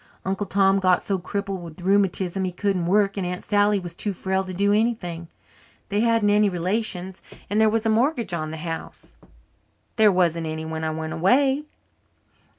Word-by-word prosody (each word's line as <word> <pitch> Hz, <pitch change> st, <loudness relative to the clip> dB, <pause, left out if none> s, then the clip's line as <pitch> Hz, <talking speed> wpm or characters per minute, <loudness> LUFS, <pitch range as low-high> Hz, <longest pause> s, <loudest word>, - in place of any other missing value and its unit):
Uncle 195 Hz, +1 st, -2 dB
Tom 195 Hz, 0 st, +3 dB
got 185 Hz, -1 st, +2 dB
so 195 Hz, -2 st, -1 dB
crippled 195 Hz, 0 st, -4 dB
with 170 Hz, +1 st, -10 dB
rheumatism 195 Hz, -1 st, +1 dB
he 185 Hz, -, -1 dB
couldn't 180 Hz, -1 st, -1 dB
work 200 Hz, +1 st, +2 dB
and 185 Hz, -2 st, -2 dB
Aunt 180 Hz, 0 st, -5 dB
Sally 205 Hz, 0 st, +2 dB
was 175 Hz, -2 st, -8 dB
too 200 Hz, +3 st, -3 dB
frail 190 Hz, +1 st, -1 dB
to 185 Hz, -, -7 dB
do 200 Hz, +3 st, +1 dB
anything. 200 Hz, -7 st, -1 dB, 0.6 s
They 205 Hz, 0 st, 0 dB
hadn't 230 Hz, -2 st, +3 dB
any 210 Hz, 0 st, +4 dB
relations 185 Hz, 0 st, -2 dB, 0.3 s
and 210 Hz, +2 st, +2 dB
there 220 Hz, -, +5 dB
was 225 Hz, +1 st, -1 dB
a -, -, +2 dB
mortgage 235 Hz, -, +1 dB
on 155 Hz, -2 st, -2 dB
the 160 Hz, -, -6 dB
house." 165 Hz, +1 st, -7 dB, 0.8 s
"There 215 Hz, -2 st, +6 dB
wasn't 170 Hz, -3 st, +1 dB
any 160 Hz, 0 st, -4 dB
when 160 Hz, 0 st, -4 dB
I 160 Hz, -, 0 dB
went 160 Hz, 0 st, -4 dB
away." 265 Hz, -, +2 dB
195 Hz, 180 wpm, -23 LUFS, 175-210 Hz, 0.8 s, There